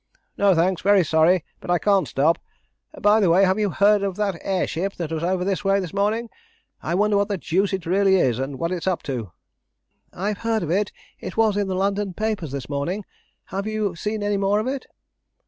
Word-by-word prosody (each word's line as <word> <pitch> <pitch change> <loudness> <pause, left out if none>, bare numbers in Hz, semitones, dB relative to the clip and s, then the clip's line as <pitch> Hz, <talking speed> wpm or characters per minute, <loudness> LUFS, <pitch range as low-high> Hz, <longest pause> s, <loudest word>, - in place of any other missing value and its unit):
"No, 200 -2 +3
thanks. 175 +2 +1
Very 200 -1 +4
sorry, 160 +3 +3
but - - -11
I 175 - +4
can't 195 +1 +2
stop. 155 +5 +2 0.6
By 210 +2 +4
the 195 -5 +3
way, 180 +4 +5
have 190 +2 +1
you 210 -1 +1
heard 205 +2 +3
of 195 -2 -2
that 205 -2 -1
air 190 -2 0
ship 195 +5 -3
that 165 -3 -5
was 160 -1 -2
over 180 +1 0
this 195 0 -1
way 195 0 +3
this 185 -3 -5
morning? 210 +4 0 0.5
I 170 - -2
wonder 205 +1 +2
what 200 0 +2
the 205 -2 -2
deuce 190 +4 0
it 190 -3 -3
really 190 +2 +3
is, 130 -10 +2
and 135 +1 -4
what 170 +4 -2
it's 180 0 -3
up 185 -2 0
to?" 120 - -4 0.8
"I've 200 +2 -3
heard 225 -2 0
of 165 - -3
it; 200 +3 +1 0.3
it 185 - -7
was 220 -2 +3
in 205 -1 0
the 190 - -2
London 195 0 -1
papers 215 -8 -2
this 135 -2 -5
morning. 170 +8 -3 0.5
Have 195 +2 -2
you 215 -4 -1
seen 210 +4 -3
any 205 0 0
more 200 +1 +2
of 215 - -2
it?" 265 0 -3
195 Hz, 220 wpm, -23 LUFS, 175-205 Hz, 0.8 s, way